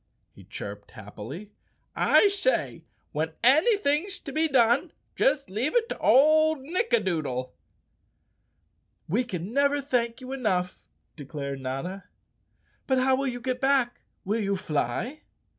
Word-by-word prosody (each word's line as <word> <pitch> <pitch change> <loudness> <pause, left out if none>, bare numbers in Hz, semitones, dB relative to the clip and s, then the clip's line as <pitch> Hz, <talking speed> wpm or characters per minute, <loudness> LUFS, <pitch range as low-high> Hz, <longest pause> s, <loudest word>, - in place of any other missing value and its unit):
he - - -16
chirped 100 0 -8
happily. 120 - -9 0.4
"I 410 - +5
say, 400 +5 -1 0.3
when 160 +1 -2
anything's 315 - +3
to 280 - -7
be 315 +3 +2
done 260 +3 +3 0.2
just 275 0 +1
leave 245 - -1
it 465 -1 +2
to - - -5
old 310 +2 +4
Nick 365 - -2
adoodle." 145 - -1 1.5
"We 215 +10 +1
can 190 -3 -6
never 280 +1 +2
thank 245 -4 -1
you 260 0 -7
enough," 190 -9 -2 0.3
declared 140 -2 -6
Notta. 135 +10 -5 0.8
"But 265 - +2
how 260 +1 +3
will 275 +1 -1
you 245 -1 -3
get 250 0 -3
back? 265 -3 +2 0.2
Will 210 +4 0
you 200 -1 0
fly?" 185 - -2
245 Hz, 130 wpm, -26 LUFS, 175-280 Hz, 1.5 s, I